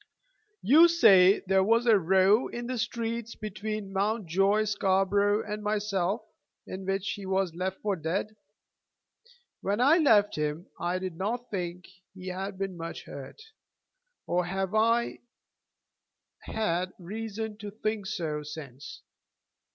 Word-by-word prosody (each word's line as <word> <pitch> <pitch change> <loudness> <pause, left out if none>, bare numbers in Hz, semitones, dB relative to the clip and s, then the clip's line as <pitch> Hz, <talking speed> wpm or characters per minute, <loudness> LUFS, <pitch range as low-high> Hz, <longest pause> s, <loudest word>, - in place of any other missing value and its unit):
"You 315 +8 +7
say 200 - +6
that - - -11
there 190 0 +4
was 230 +4 +3
a 220 -4 +5
row 190 +6 +4
in 240 0 -6
the 250 0 -3
streets 230 -1 -3
between 215 -1 -5
Mountjoy 200 0 +1
Scarborough 200 0 +2
and 210 0 -5
myself 210 -1 -1 0.4
in 190 0 -7
which 195 0 -1
he 200 -2 -6
was 190 -2 0
'left 185 +2 -3
for 205 -2 0
dead.' 185 +6 -3 1.3
When 200 +3 -1
I 290 +7 +5
left 210 - +4
him 150 +3 -2
I 175 +1 -1
did 185 -3 -5
not 235 +6 -3
think 180 -2 -4 0.3
he 185 0 -7
had 190 +2 -5
been 195 -2 -4
much 165 0 -6
hurt, 140 - -10 0.8
nor 180 +1 +1
have 190 +2 -3
I 230 +2 +2 1.3
had 185 -4 -1
reason 220 +3 -5
to 210 -1 -7
think 215 -1 -3
so 160 -7 -3
since. 145 -3 -9
195 Hz, 135 wpm, -28 LUFS, 185-215 Hz, 1.3 s, You